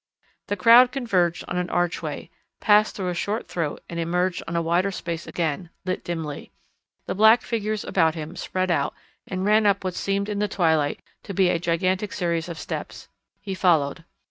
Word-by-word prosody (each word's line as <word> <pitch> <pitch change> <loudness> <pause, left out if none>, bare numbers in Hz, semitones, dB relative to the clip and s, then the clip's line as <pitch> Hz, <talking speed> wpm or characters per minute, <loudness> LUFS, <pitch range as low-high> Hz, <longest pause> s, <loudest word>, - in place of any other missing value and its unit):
The 205 - -2
crowd 235 +5 +7
converged 185 -10 0
on 180 - -3
an 180 0 -2
archway, 175 0 -2 0.3
passed 210 0 +4
through 185 -2 -2
a - - -1
short 205 +5 -2
throat 160 -4 -3
and 170 - -5
emerged 180 +2 0
on 165 - -4
a 170 - +2
wider 175 +4 +2
space 170 -3 -5
again, 170 +1 -2 0.2
lit 185 -1 -2
dimly. 160 -4 -5 0.5
The - - -2
black 220 +4 +6
figures 215 -2 -2
about 165 -3 +2
him 155 -1 -6
spread 185 -1 -2
out 140 -4 0 0.3
and 185 0 -3
ran 210 +1 +4
up 200 -1 +2
what 185 -1 -2
seemed 200 +2 -1
in 205 -1 -3
the 210 - +1
twilight 160 -6 +1 0.2
to 200 - -7
be 185 -1 +4
a 170 - +1
gigantic 185 +4 0
series 170 -2 -1
of 170 - -6
steps. - - -6 0.3
He 195 -2 -4
followed. 165 -4 +2
180 Hz, 185 wpm, -24 LUFS, 170-200 Hz, 0.5 s, crowd